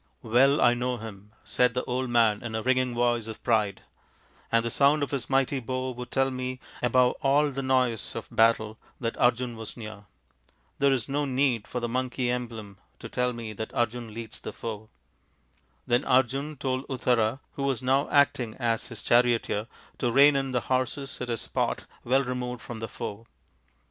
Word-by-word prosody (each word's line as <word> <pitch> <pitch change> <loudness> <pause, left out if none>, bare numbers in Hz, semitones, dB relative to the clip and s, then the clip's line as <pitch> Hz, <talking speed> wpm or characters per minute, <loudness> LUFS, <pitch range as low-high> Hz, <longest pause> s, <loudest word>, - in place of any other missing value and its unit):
" - - -43
Well 135 +6 +4
I 120 - +6
know 125 +1 -1
him/' 105 -3 -9 0.2
said 125 -1 +2
the 125 - 0
old 130 0 -2
man 115 -3 +3
in 115 -2 -5
a 110 - -2
ringing 130 -1 +1
voice 120 -2 +1
of 110 -1 -8
pride, 105 -5 +1 0.4
" - - -32
and 115 0 +3
the 115 - -1
sound 145 +3 +4
of 140 - -3
his 140 -3 -3
mighty 135 0 +2
bow 130 +1 -3
would 125 0 -7
tell 135 0 +1
me 130 0 -4 0.2
above 125 +1 +3
all 145 +1 +3
the 135 0 -3
noise 130 -5 +1
of - - -5
battle 110 -1 +2 0.2
that 115 -2 -2
Arjun 120 0 +2
was 110 +1 -7
near. 105 -3 -8 0.7
There 140 0 +4
is 125 -5 0
no 145 +1 0
need 130 -5 +1
for 125 - -3
the 120 - -2
monkey 125 0 -1
emblem 115 -5 -5 0.2
to - - -9
tell 125 0 0
me 115 -2 -6
that 110 +1 -5
Arjun 120 -1 -1
leads 115 0 -8
the - - -5
foe." 110 -1 -6 1.0
Then 120 +1 +2
Arjun 135 +4 +2
told 130 0 -2
Uttara, 125 -2 +1
who - - -7
was 135 -2 0
now 135 +3 +2
acting 130 -5 +2
as 115 -3 -1
his 115 -4 -7
charioteer, 120 -3 +2 0.3
to 120 - +1
rein 140 +3 +6
in 135 -1 0
the 125 -1 0
horses 130 +2 -2
at 125 - -3
a 115 - 0
spot - - -2 0.2
well 135 +3 +3
removed 125 -1 -4
from 120 -2 -7
the 115 -1 -5
foe. 110 +3 -6
125 Hz, 190 wpm, -27 LUFS, 115-130 Hz, 1.0 s, I